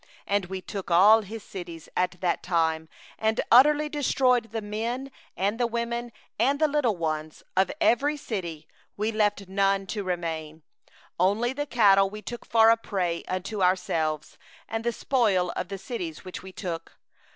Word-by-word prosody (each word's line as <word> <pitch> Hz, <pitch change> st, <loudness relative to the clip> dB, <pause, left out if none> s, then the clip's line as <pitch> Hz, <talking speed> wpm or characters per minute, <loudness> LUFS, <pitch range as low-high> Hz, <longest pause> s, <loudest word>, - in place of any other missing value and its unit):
34And 200 Hz, -3 st, 0 dB
we 190 Hz, -1 st, -4 dB
took 195 Hz, -1 st, -6 dB
all 205 Hz, +6 st, +7 dB
his 215 Hz, +1 st, -8 dB
cities 170 Hz, -4 st, -8 dB
at 180 Hz, -1 st, 0 dB
that 175 Hz, -2 st, 0 dB
time, 160 Hz, -2 st, 0 dB, 0.3 s
and 220 Hz, 0 st, +1 dB
utterly 295 Hz, +5 st, +6 dB
destroyed 255 Hz, -5 st, +2 dB
every 225 Hz, -, -3 dB
city, -, -, 0 dB
the 205 Hz, -, -10 dB
men, 235 Hz, +6 st, -3 dB, 0.3 s
and 200 Hz, +5 st, 0 dB
the 240 Hz, -, +2 dB
women, 235 Hz, +1 st, -3 dB, 0.3 s
and 280 Hz, +2 st, +2 dB
the 310 Hz, -, +4 dB
little 280 Hz, -9 st, +1 dB
ones; 155 Hz, -1 st, -3 dB, 1.5 s
we 215 Hz, +2 st, 0 dB
left 210 Hz, -2 st, 0 dB
none 195 Hz, 0 st, +1 dB
remaining; 165 Hz, -5 st, -4 dB, 0.6 s
35only 215 Hz, +8 st, +2 dB
the 290 Hz, +1 st, -3 dB
cattle 195 Hz, -6 st, +5 dB
we 210 Hz, +1 st, -9 dB
took 240 Hz, -1 st, -7 dB
for 225 Hz, 0 st, +6 dB
a 230 Hz, -, +4 dB
prey 180 Hz, -6 st, -2 dB
unto 190 Hz, +3 st, -3 dB
ourselves, 160 Hz, -4 st, 0 dB, 0.3 s
with 225 Hz, -, 0 dB
the 235 Hz, +1 st, 0 dB
spoil 210 Hz, -8 st, +1 dB
of -, -, -4 dB
the 195 Hz, -, -5 dB
cities 185 Hz, -, -6 dB
which 185 Hz, -, -7 dB
we 190 Hz, -, -10 dB
had 185 Hz, -, -16 dB
taken. 170 Hz, -4 st, -4 dB
200 Hz, 160 wpm, -26 LUFS, 180-235 Hz, 1.5 s, all